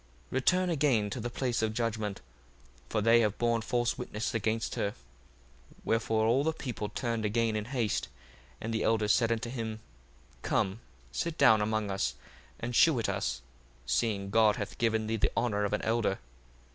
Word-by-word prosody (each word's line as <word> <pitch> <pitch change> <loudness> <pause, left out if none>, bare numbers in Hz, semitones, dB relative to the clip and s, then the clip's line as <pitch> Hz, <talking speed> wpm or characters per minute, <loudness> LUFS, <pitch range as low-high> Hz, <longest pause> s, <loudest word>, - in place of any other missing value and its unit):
1:49 - - -30
Return 180 +8 +2
again 135 -9 +2
to 130 - -3
the 120 +1 -3
place 120 -1 -1
of 110 -1 -1
judgment: 110 -4 -2 0.7
for 110 - 0
they 115 +2 +6
have 105 -2 +1
borne 115 -1 +1
false 120 +1 0
witness 115 0 -3
against 115 0 -1
her. 100 0 -1
1:50 - - -24 0.9
Wherefore 110 -1 +1
all 125 +5 +3
the 160 +1 +1
people 120 -8 -4
turned 115 0 -2
again 110 +1 +1
in 105 -1 -2
haste, 120 -4 -1 0.5
and 115 +1 -4
the 110 - 0
elders 110 -2 +2
said 115 -2 +2
unto 115 +1 -1
him, 110 -3 -4 0.6
Come, 95 - 0 0.3
sit 165 - -2
down 110 -1 +6
among 110 -1 0
us, 60 -11 -1 0.4
and 120 +1 -4
shew 160 -1 +6
it 115 - 0
us, - - -2 0.4
seeing 100 - 0
God 110 -1 +5
hath 105 -3 -6
given 110 -2 +1
thee 110 +1 -1
the - - +1
honour 105 -3 +1
of 100 - -2
an 105 - -1
elder. 110 -4 +1
115 Hz, 180 wpm, -30 LUFS, 105-120 Hz, 0.9 s, they